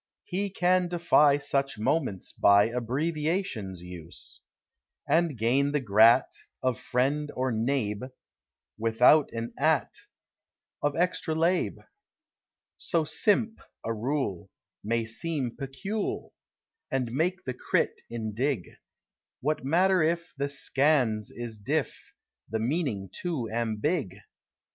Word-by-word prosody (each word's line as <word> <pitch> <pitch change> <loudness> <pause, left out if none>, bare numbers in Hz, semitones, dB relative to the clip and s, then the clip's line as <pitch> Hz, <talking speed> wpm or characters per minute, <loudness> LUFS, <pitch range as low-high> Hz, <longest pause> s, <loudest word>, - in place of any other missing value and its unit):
He 200 +2 -2
can 180 -1 +2
defy 165 -5 +4
Such 140 -3 -1
moments 125 - -1
by 100 +2 +5
Abbreviation's 135 - -2
use, 90 -2 -8 0.7
And 165 -5 +2
gain 135 +6 +2
the 145 - +2
grat: 115 +1 +5 0.3
Of 130 -2 0
friend 140 +4 0
or 130 0 0
neighb: 115 -1 -1 0.7
Without 120 +7 +5
an 115 0 -5
at: 155 -1 +2 0.9
Of 145 0 0
extra 175 -2 0
lab: 170 +3 +1 1.0
So 165 -3 +1
simp: 215 +7 +1 0.3
a 115 - -1
rule 110 - -2 0.3
May 115 +1 0
seem 130 +1 -3
pecul: 195 +10 -4 0.6
And 125 -3 -1
make 175 +8 0
the 130 - -3
crit: 125 - 0
indig: 115 0 -2 0.6
What 150 +1 -1
matter 180 +6 +3
if 170 +2 0
The 140 +1 -2
scans: 135 -6 +2
is 115 -3 -7
diff: 100 - -3 0.3
The 110 - -1
meaning 115 - -1
too 160 -10 -3
ambig 115 - -1
135 Hz, 110 wpm, -28 LUFS, 115-160 Hz, 1.0 s, by